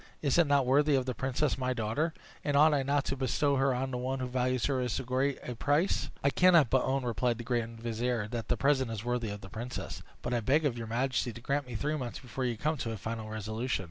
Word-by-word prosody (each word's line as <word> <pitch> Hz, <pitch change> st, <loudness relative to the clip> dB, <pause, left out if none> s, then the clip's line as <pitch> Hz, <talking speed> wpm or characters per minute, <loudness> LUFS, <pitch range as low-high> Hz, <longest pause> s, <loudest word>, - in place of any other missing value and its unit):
Is 145 Hz, +3 st, +3 dB
it 170 Hz, -, +5 dB
not 140 Hz, -2 st, +3 dB
worthy 145 Hz, +3 st, +4 dB
of 130 Hz, -1 st, +1 dB
the 130 Hz, -, -2 dB
princess 135 Hz, +3 st, -1 dB
my 130 Hz, 0 st, 0 dB
daughter? 120 Hz, +8 st, -1 dB, 0.3 s
And 145 Hz, -1 st, +1 dB
ought 155 Hz, +1 st, +6 dB
I 145 Hz, -, +2 dB
not 140 Hz, +1 st, +1 dB
to -, -, -1 dB
bestow 140 Hz, +2 st, +1 dB
her 135 Hz, +1 st, +3 dB
on 130 Hz, +1 st, -1 dB
one 130 Hz, +2 st, -2 dB
who 130 Hz, -, -2 dB
values 125 Hz, -1 st, 0 dB
her 135 Hz, -2 st, +1 dB
at 125 Hz, -, -1 dB
so 130 Hz, -, -2 dB
great 130 Hz, +2 st, 0 dB
a 125 Hz, -, -3 dB
price?" 145 Hz, +9 st, +1 dB
"I 140 Hz, -, +4 dB
cannot 170 Hz, -7 st, +5 dB
but 130 Hz, -, +4 dB
own," 135 Hz, -1 st, 0 dB
replied 120 Hz, 0 st, 0 dB
the 120 Hz, -, -6 dB
grand 115 Hz, -1 st, -2 dB
vizier, 115 Hz, -1 st, -1 dB
"that 115 Hz, -2 st, -4 dB
the -, -, +1 dB
present 135 Hz, -3 st, +2 dB
is 110 Hz, 0 st, -5 dB
worthy 120 Hz, -2 st, -1 dB
of 100 Hz, 0 st, -6 dB
the 95 Hz, -, -10 dB
princess; 120 Hz, +4 st, -6 dB, 0.2 s
but 120 Hz, -, -2 dB
I 120 Hz, -, +2 dB
beg 140 Hz, +8 st, +2 dB
of 135 Hz, -5 st, +1 dB
your 115 Hz, -1 st, -5 dB
majesty 125 Hz, +2 st, 0 dB
to 115 Hz, -, -10 dB
grant 140 Hz, +2 st, -1 dB
me 120 Hz, -, -7 dB
three 150 Hz, +7 st, -1 dB
months 125 Hz, -4 st, -4 dB
before 130 Hz, 0 st, -4 dB
you 120 Hz, -2 st, -1 dB
come 155 Hz, +6 st, 0 dB
to 120 Hz, -, -3 dB
a 110 Hz, -, -3 dB
final 110 Hz, +1 st, -5 dB
resolution. 110 Hz, +3 st, -2 dB
130 Hz, 260 wpm, -31 LUFS, 115-140 Hz, 0.3 s, ought